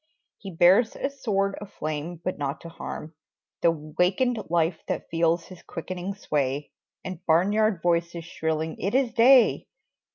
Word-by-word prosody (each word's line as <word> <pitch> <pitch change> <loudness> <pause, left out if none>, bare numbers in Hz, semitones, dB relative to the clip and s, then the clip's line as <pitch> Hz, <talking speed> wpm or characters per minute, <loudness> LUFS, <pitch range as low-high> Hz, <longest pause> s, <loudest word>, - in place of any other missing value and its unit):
He 195 - -8
bears 185 +6 +4
a 275 - -2
sword 200 -7 -1
of 205 -1 -9
flame 155 0 -4
but 185 - -3
not 140 0 -2
to 170 - -9
harm 160 -1 -7 0.5
The 170 - +5
wakened 180 - 0
life 165 -1 +1
that - - -3
feels 165 0 +1
his 185 -2 -13
quickening 185 +3 -6
sway 145 -5 -2 0.3
And 185 -2 -6
barnyard 200 +4 +3
voices 170 -1 0
shrilling 160 -1 -2
"It 195 +6 -1
is 260 -3 +2
day!" 250 +2 +5
175 Hz, 150 wpm, -26 LUFS, 160-200 Hz, 0.5 s, The